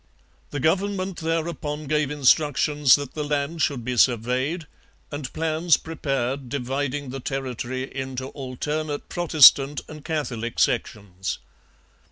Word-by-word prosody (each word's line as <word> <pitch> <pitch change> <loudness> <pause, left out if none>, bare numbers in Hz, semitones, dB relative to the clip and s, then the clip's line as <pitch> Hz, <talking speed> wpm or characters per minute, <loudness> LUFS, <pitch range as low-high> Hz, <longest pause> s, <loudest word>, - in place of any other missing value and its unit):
The 145 - -4
government 190 +4 0
thereupon 160 -2 -2
gave 150 -1 +1
instructions 145 0 +4
that 145 -2 -5
the 150 - -3
land 145 +2 -2
should 125 -6 0
be 125 -1 -2
surveyed 130 +8 +1 0.5
and 145 -3 -5
plans 160 +1 +2
prepared 135 -4 -3
dividing 140 +1 -3
the 135 - -5
territory 130 -1 -4
into 130 -1 -5
alternate 145 +3 -4
Protestant 150 -4 +6
and 155 -1 -10
Catholic 125 -8 -3
sections. 95 -2 -1
145 Hz, 115 wpm, -24 LUFS, 130-155 Hz, 0.5 s, Protestant